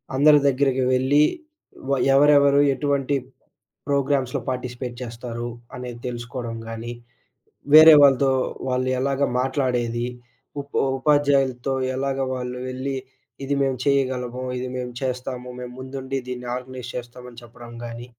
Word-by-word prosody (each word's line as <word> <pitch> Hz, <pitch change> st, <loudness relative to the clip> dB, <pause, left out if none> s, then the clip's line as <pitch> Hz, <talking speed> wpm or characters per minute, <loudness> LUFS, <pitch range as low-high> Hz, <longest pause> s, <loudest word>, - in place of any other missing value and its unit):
అందరి 145 Hz, +2 st, +6 dB
దగ్గరికి 135 Hz, -1 st, +2 dB
వెళ్లి 135 Hz, +4 st, +4 dB, 0.7 s
వ -, -, 0 dB, 0.2 s
ఎవరెవరు 140 Hz, 0 st, +5 dB
ఎటువంటి 140 Hz, 0 st, 0 dB, 0.7 s
ప్రోగ్రామ్స్‌లో 140 Hz, -2 st, 0 dB
పార్టిసిపేట్ 125 Hz, -1 st, -4 dB
చేస్తారు, 120 Hz, 0 st, -6 dB, 0.3 s
అనేది 125 Hz, -1 st, -7 dB
తెలుసుకోడం 120 Hz, -1 st, -5 dB
గాని, 115 Hz, +1 st, -6 dB, 0.8 s
వేరే 155 Hz, 0 st, +11 dB
వాళ్ళతో 135 Hz, -1 st, +5 dB, 0.4 s
వాళ్ళు 130 Hz, 0 st, 0 dB
ఎలాగా 140 Hz, +1 st, +1 dB
మాట్లాడేది, 125 Hz, -3 st, -1 dB, 0.5 s
ఉ -, -, -1 dB, 0.4 s
ఉపాధ్యాయులతో 135 Hz, -3 st, +2 dB, 0.2 s
ఎలాగా 135 Hz, 0 st, -1 dB
వాళ్ళు 125 Hz, 0 st, -5 dB
వెళ్లి 130 Hz, +1 st, -3 dB, 0.5 s
ఇది 140 Hz, +1 st, -1 dB
మేము 135 Hz, -2 st, 0 dB
చేయగలము, 130 Hz, -3 st, 0 dB, 0.2 s
ఇది 130 Hz, +1 st, -4 dB
మేము 125 Hz, -1 st, -4 dB
చేస్తాము, 125 Hz, -1 st, -4 dB
మేము 125 Hz, 0 st, -7 dB
ముందుండి 130 Hz, 0 st, -5 dB
దీన్ని 125 Hz, -1 st, -6 dB
ఆర్గనైజ్ 125 Hz, -1 st, -8 dB
చేస్తాము. 125 Hz, 0 st, -8 dB
అని 120 Hz, -, -12 dB
చెప్పడం 120 Hz, 0 st, -13 dB
గాని 120 Hz, +1 st, -7 dB
130 Hz, 120 wpm, -23 LUFS, 125-140 Hz, 0.8 s, వేరే